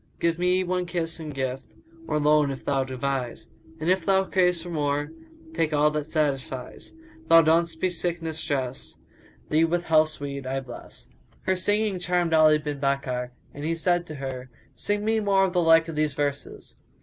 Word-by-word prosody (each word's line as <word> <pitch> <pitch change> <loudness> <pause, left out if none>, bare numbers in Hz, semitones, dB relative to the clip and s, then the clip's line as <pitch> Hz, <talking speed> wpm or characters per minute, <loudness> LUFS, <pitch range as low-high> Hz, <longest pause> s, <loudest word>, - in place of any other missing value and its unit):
Give 170 0 0
me 180 +1 +2
one 180 0 -1
kiss 170 -2 -3
in 155 -1 -6
gift 135 -2 -4 0.2
* 330 0 -20
Or 150 - 0
loan, 150 -1 +4
if 135 -1 -6
thou 135 -1 +1
devise: 130 -1 -3 0.3
And 155 - -3
if 185 -1 +2
thou 190 +2 +3
crave 180 -2 +2
for 175 +1 -8
more 145 -2 -1 0.2
* 320 0 -20
Take 160 - 0
all 150 +1 +4
that 150 0 -4
satisfies.[FN#179] 155 - -4
Thou 165 0 +8
donn'st 165 +1 +2
me 185 - +3
sickness 165 -2 -3
dress 130 -3 -3 0.3
* - - -28
Thee 155 +2 +4
with 170 +1 +1
health's 155 -1 +2
weed 140 -2 -5
I 135 +1 -1
bless." 125 -2 -10 0.4
Her 190 - +1
singing 205 +1 +1
charmed 175 -2 0
Ali 155 -1 +6
bin 150 -2 -5
Bakkar, 135 -3 -1 0.2
and 145 - -8
he 165 +2 0
said 175 +1 0
to 155 - -7
her, 130 -2 -6 0.2
"Sing 205 0 -2
me 220 0 +2
more 200 -2 +3
of 185 - -3
the 180 - +3
like 165 0 +5
of 165 - -6
these 150 -2 0
verses." 145 -1 -4
160 Hz, 195 wpm, -25 LUFS, 140-180 Hz, 0.4 s, Thou